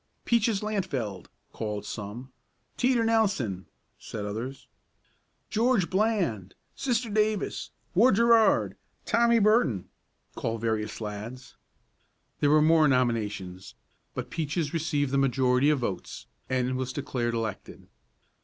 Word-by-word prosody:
"Peaches 225 -3 +2
Lantfeld," 145 - -3 0.2
called 105 -2 -4
some. 110 +5 -7 0.4
"Teeter 250 -2 +2
Nelson," 195 - +1 0.3
said 105 - -6
others. 125 +6 -5 0.9
"George 225 -5 +2
Bland! 185 - 0 0.2
Sister 245 -2 0
Davis! 215 -1 0 0.2
Ward 215 +4 +5
Gerard! 230 0 +4 0.3
Tommy 235 0 +4
Barton," 185 - +2 0.4
called 115 0 -3
various 110 -2 -2
lads. 110 +4 -7 0.8
There 145 - +3
were 150 +1 +5
more 160 -1 +5
nominations, 105 -8 -1 0.4
but - - -5
Peaches 155 -1 -2
received 145 -4 0
the 140 - +2
majority 130 +1 +3
of 150 - +3
votes, 120 -8 -4 0.2
and 130 0 0
was 130 0 -3
declared 120 -4 -2
elected. 115 -2 -5
135 Hz, 110 wpm, -27 LUFS, -, 0.9 s, Ward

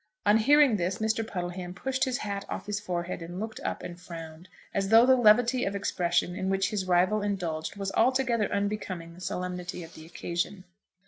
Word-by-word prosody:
On 205 +1 +6
hearing 280 0 +5
this, 180 +1 -1
Mr. 220 +1 0
Puddleham 180 -3 -5
pushed 265 +7 0
his 255 -2 -1
hat 200 -1 -4
off - - -5
his 205 0 -2
forehead 180 -3 -3
and 175 +2 -6
looked 220 +1 -5
up - - -4
and 175 0 -8
frowned, 165 0 -9 0.2
as 195 0 0
though 225 +2 +8
the 260 0 +6
levity 245 +2 +4
of 200 - -1
expression 180 -2 0
in 190 - -2
which 195 +1 +1
his 195 -3 -2
rival 185 +4 +3
indulged, 180 -6 -2
was 195 -1 -3
altogether 235 -2 +2
unbecoming 200 -4 -3
the 175 - -14
solemnity 180 0 -4
of 165 - -12
the 160 0 -12
occasion. 175 +3 -3
195 Hz, 190 wpm, -28 LUFS, 175-220 Hz, 0.2 s, though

